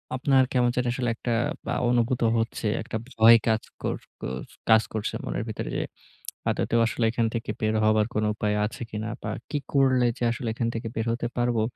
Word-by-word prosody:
আপনার 130 0 +4
কেমন 125 -1 +3
জানি 125 0 0
আসলে 125 -1 -1
একটা 120 - -3 0.3
বা - - -1 0.2
অনুভূত 120 +1 +1 0.2
হচ্ছে। 115 0 -3 0.2
একটা - - -4
ভয় 115 0 +7
কাজ 110 -1 +2 0.2
কর - - -1 0.3
কর 65 +1 -4 0.3
কাজ 110 0 +7
করছে 110 -2 -2
মনের 105 - -2
ভিতরে 110 - -4
যে, - - 0 0.7
আদতেও 115 - +1
আসলে 115 0 0
এখান 115 -1 +1
থেকে 115 -2 -4
বের 110 0 +1
হবার 110 0 +4
কোন 105 - 0
উপায় 105 -1 0
আছে 105 - -6
কিনা 110 +1 -4
বা, - - -4 0.2
কি 150 - -1 0.2
করলে 130 -3 +4
যে - - -4
আসলে 120 +1 -4
এখান 115 +1 -1
থেকে 115 0 -4
বের 110 - -1
হতে 120 +1 -1
পারবো। 120 -2 +1
115 Hz, 195 wpm, -26 LUFS, 110-125 Hz, 0.7 s, ভয়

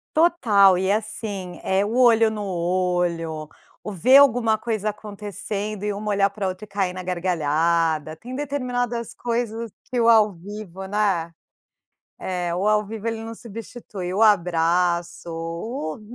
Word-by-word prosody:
Total 215 - +5
e 190 +1 +1
assim, 205 -3 -4
eh, 195 +2 +1
o 225 +3 -3
olho 230 -3 +5
no 210 -1 -4
olho, 175 -3 -1 0.4
o 210 - -5
ver 250 +9 +6
alguma 240 -5 +5
coisa 215 -2 -2
acontecendo 210 0 -5
e 210 -1 -1
uma 210 +1 -4
olhar 200 -1 +3
pra 200 -1 -3
outra 185 +3 -5
e - - -24
cair 195 -3 -1
na 185 0 -6
gargalhada. 165 -3 0
Tem 250 +9 -9
determinadas 245 -5 -2
coisas 230 -2 -3
que 250 - -3
o 230 0 +4
ao 215 -3 +5
vivo, 190 +1 -8
né. 190 -5 0 0.9
É, 175 -2 -3
o 190 +3 -1
ao 215 0 +3
vivo 220 +1 -6
ele 225 -1 -3
não 225 0 -7
substitui. 220 -4 -7
O 205 - 0
abraço, 175 -3 +2
o 165 - -5
200 Hz, 150 wpm, -23 LUFS, 180-225 Hz, 0.9 s, ver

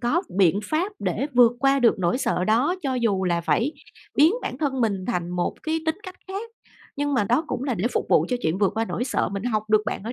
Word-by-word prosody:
có 260 +9 +1 0.2
biện 190 +1 +4
pháp 335 - -1
để 275 - -1
vượt 245 -1 +6
qua 275 0 +3
được 235 -4 +4
nỗi 180 +6 +1
sợ 180 -8 0
đó 240 - +2
cho 270 -3 -1
dù 215 -6 0
là 170 -2 +1
phải 235 - 0 0.4
biến 315 +7 +5
bản - - -4
thân 275 -4 -1
mình 200 -5 0
thành 175 -8 -2
một 180 0 -2
cái 320 +1 -1
tính 320 +1 +1
cách 370 -4 -9
khác. 410 +4 -5 0.5
Nhưng 290 0 -1
mà 225 -6 +2
đó 245 +10 +1
cũng 260 - -3
là 265 -3 -1
để 190 - -3
phục - - 0
vụ - - +4
cho 250 - 0
chuyện 160 +4 0
vượt 200 -2 +3
qua 225 - +1
nỗi 235 - -3
sợ, 260 - 0
mình 200 +1 -4
học 215 -4 0
được 215 0 +4
bạn - - -3
ở 225 +3 -5
240 Hz, 255 wpm, -24 LUFS, 200-290 Hz, 0.5 s, vượt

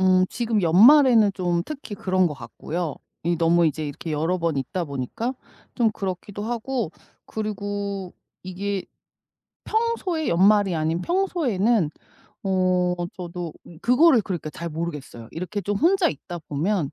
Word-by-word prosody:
음. 185 0 +5
지금 225 -3 0
연말에는 225 - +7
좀 175 -2 0
특히 280 -8 -7
그런 185 -2 +1
것 155 - -3
같고요, 150 +6 -5 0.3
이 170 +1 +1
너무 170 +1 +4
이제 155 0 -1
이렇게 145 +3 -5
여러 160 +5 0
번 165 -3 0
있다 155 +7 -2
보니까 140 - -3 0.4
좀 235 -3 +3
그렇기도 195 0 -5
하고 235 -3 -2 0.4
그리고 205 -3 -4 0.3
이게 190 +1 -3 0.8
평소에 435 -8 0
연말이 195 +2 +4
아닌 160 +2 0
평소에는 240 - +1 0.5
어 185 -2 +2 0.2
저도 175 -2 -5 0.3
그거를 250 +1 +5
그러니까 175 -6 -4
잘 170 +3 -5
모르겠어요. 150 -8 -6
이렇게 185 +5 -4
좀 205 +2 -1
혼자 355 - +4
있다 175 -1 -7
보면 160 +1 0
185 Hz, 290 characters per minute, -24 LUFS, 170-220 Hz, 0.8 s, 연말에는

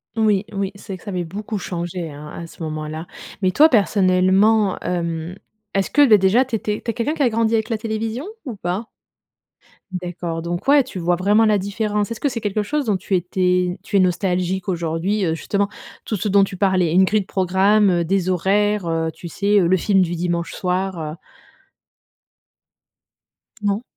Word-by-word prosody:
Oui, 210 -3 +2
oui, 195 -1 -2
c'est 200 -1 -8
que - - -19
ça 210 - -7
avait 180 -2 -2
beaucoup 210 +6 -5
changé, 175 -2 -4
hein, 145 +1 -10
à 170 - -6
ce 165 - -15
moment-là. 155 +1 -5 0.3
Mais 185 - +3
toi, 300 +11 +6
personnellement, 200 - +3
hem, 170 -1 -3 0.4
est-ce 195 -1 0
que, 290 -1 +5
bah 215 -3 +7
déjà 200 +7 +3
tu 250 - -3
étais 210 -1 -3
tu 235 - 0
es - - -9
quelqu'un 265 +9 -1
qui 295 - 0
a 245 - +4
grandi 230 0 +1
avec 220 +1 -1
la 225 -2 -1
télévision 225 +4 -3 0.2
ou 245 - -5
pas? 190 +3 -4 1.0
D'accord, 175 -2 -4
donc 175 +6 -4
ouais, 285 0 +6
tu 195 - -9
vois 175 0 +1
vraiment 205 +5 +3
la 210 -2 +3
différence. 205 +2 -1
Est-ce 230 - -5
que - - 0
c'est 235 -3 -5
quelque 210 0 -1
chose 290 +6 -1
dont 210 -4 +1
tu 185 +1 -2
étais 180 0 0
tu 200 - -5
es - - +5
nostalgique 185 +1 0
aujourd'hui, 175 +3 -1
heu, 160 -1 0
justement, 200 +4 -1 0.3
tout 215 - -3
ce 210 - -2
dont 200 0 +5
tu 195 -1 -4
parlais, 185 -4 +2
une 185 +3 +5
grille 210 +2 +1
de - - -9
programme, 195 +2 +3
heu, 175 -1 +1
des 185 +1 0
horaires, 200 +1 +1
heu, 165 0 -1
tu 165 +2 -9
sais, 200 +4 +2
heu, 175 - +3
le 185 +2 +3
film 195 +1 +2
du 175 -1 0
dimanche 170 0 -2
soir, 185 0 -2
heu? 155 0 -5 2.5
Non? 205 +2 0
190 Hz, 195 wpm, -21 LUFS, 175-210 Hz, 2.5 s, bah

